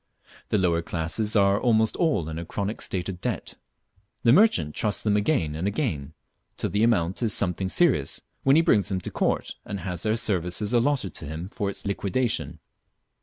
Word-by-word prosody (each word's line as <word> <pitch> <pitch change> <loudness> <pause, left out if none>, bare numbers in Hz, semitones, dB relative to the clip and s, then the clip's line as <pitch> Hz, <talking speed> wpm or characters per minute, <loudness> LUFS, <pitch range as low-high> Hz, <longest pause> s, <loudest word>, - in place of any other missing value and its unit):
The - - +2
lower 85 -3 +2
classes 90 +7 -2
are 100 -1 +4
almost 110 -3 +2
all 150 - +1
in 80 0 -5
a - - -4
chronic 100 +5 -4
state 90 -2 -3
of 90 -2 -6
debt. - - -3 0.7
The 115 - +6
merchant 115 - +4
trusts 105 -2 -1
them 105 -1 +2
again 105 - +1
and 80 +5 -2
again, 80 - -2 0.4
till - - -2
the 105 - +1
amount 100 -5 +2
is 110 -4 +1
something 95 -1 0
serious, 125 - +2 0.2
when 135 +1 +4
he 165 - +5
brings 105 - +3
them 95 -2 -1
to - - -5
court - - -1
and 100 -2 -6
has 90 -3 -4
their 110 +2 +1
services 100 0 -1
allotted 120 - +1
to - - -7
him 80 +5 -6
for 100 -1 -3
its 100 - -7
liquidation. 100 - -1
100 Hz, 185 wpm, -25 LUFS, 85-115 Hz, 0.7 s, The